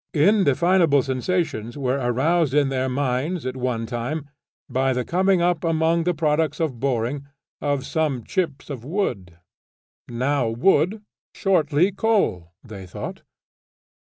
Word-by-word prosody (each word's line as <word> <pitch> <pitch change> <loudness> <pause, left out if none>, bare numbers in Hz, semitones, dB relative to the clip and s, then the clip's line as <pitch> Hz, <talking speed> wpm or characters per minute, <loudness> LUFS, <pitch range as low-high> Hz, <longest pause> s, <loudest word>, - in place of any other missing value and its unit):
Indefinable 170 -3 +4
sensations 135 -3 -2
were 135 0 0
aroused 135 +5 +1
in 145 -2 +3
their 130 -1 -1
minds 140 +5 -1
at 130 0 -3
one 125 -3 -2
time 125 +6 -4 0.4
by 130 0 +1
the 125 -1 -2
coming 185 0 +2
up 175 -2 +1
among 165 0 +1
the 180 - +2
products 150 -1 0
of 150 -8 -2
boring, 135 +2 -1 0.3
of 145 -2 -1
some 150 -7 -1
chips 150 - -3
of 125 -5 -6
wood. 120 - -3 0.7
Now 125 +1 0
wood, 190 - +2 0.3
shortly 175 -1 +2
coal, 195 - 0
they 100 -5 -9
thought. 90 - -7
145 Hz, 130 wpm, -23 LUFS, 125-170 Hz, 0.7 s, Indefinable